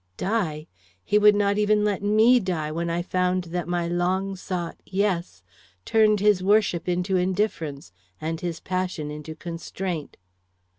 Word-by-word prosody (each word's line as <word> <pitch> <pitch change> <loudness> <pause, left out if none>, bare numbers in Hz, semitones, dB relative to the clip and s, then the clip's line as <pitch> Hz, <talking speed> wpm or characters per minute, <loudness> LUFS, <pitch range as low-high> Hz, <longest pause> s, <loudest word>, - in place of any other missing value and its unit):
Die? 175 -8 -1 0.4
He 210 - +3
would 210 0 +6
not 205 0 +2
even 210 0 +3
let 205 -2 0
me 220 +5 +5
die 170 -7 -2
when 170 +2 -2
I 170 +1 -1
found 180 0 0
that 175 -2 -2
my 175 -1 -1
long 185 +3 0
sought 180 -2 -5
'Yes' 185 - -2 0.4
turned 215 -2 +4
his 205 -3 +4
worship 195 -3 +2
into 180 +2 0
indifference, 180 - -2 0.3
and 160 +1 -3
his 170 -2 -3
passion 180 -5 -3
into 150 +1 -7
constraint. 170 0 -5
180 Hz, 145 wpm, -25 LUFS, 170-205 Hz, 0.4 s, would